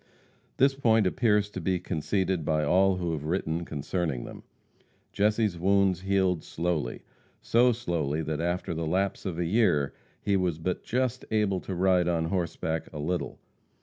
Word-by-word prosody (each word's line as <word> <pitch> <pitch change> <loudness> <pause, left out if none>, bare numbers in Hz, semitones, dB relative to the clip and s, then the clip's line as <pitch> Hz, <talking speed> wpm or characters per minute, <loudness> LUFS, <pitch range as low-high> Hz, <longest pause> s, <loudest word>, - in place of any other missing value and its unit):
This 135 +1 +4
point 115 -6 +3
appears 105 +1 +2
to 95 - -5
be 90 +2 +1
conceded 90 +1 -1
by 75 0 +1
all 95 +5 +3
who 90 -2 -2
have 75 -3 -3
written 85 0 -1
concerning 75 -3 -2
them. - - -9 0.7
Jesse's 105 -3 +1
wounds 95 0 +3
healed 95 -3 +1
slowly 85 -2 -2 0.4
so 125 +2 +4
slowly 85 -10 -2
that 80 0 -2
after 85 0 -1
the 80 0 -3
lapse 95 +4 -1
of 85 -3 -4
a 85 - 0
year 80 -7 +2 0.3
he 100 - 0
was 90 -4 0
but 90 +3 -2
just 130 +1 -1
able 105 -4 +1
to 95 - -5
ride 90 -1 +3
on 85 -2 +1
horseback 80 -2 -2
a 75 - -8
little. 85 +4 -2
90 Hz, 160 wpm, -28 LUFS, 80-100 Hz, 0.7 s, This